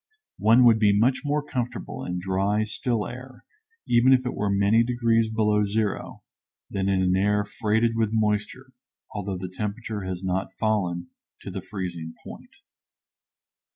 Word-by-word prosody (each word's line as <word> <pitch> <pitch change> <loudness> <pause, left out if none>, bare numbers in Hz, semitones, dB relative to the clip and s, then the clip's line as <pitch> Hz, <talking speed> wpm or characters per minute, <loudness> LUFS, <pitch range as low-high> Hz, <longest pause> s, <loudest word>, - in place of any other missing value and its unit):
One 115 +4 +5
would 115 -2 +6
be 100 -2 +4
much 130 +5 +3
more 145 0 0
comfortable 125 -4 -4
in 90 0 -3
dry, 95 +3 0
still 110 +1 -2
air, 125 +1 -10 0.4
even 120 +3 +5
if 130 0 +2
it 125 - -2
were 105 - -1
many 100 +3 +3
degrees 115 -2 +1
below 105 -1 +2
zero, 105 0 -2 0.5
than 100 0 -1
in 95 -1 +2
an 90 0 +2
air 105 +2 +2
freighted 110 +2 +1
with 115 -2 +1
moisture, 110 +4 -1 0.4
although 100 -2 -3
the 90 +1 -5
temperature 105 +3 -4
has 95 -1 -5
not 95 +1 -2
fallen 90 -6 -1 0.3
to - - -7
the - - -5
freezing 85 -5 -6
point. - - -11
105 Hz, 155 wpm, -25 LUFS, 95-115 Hz, 0.5 s, would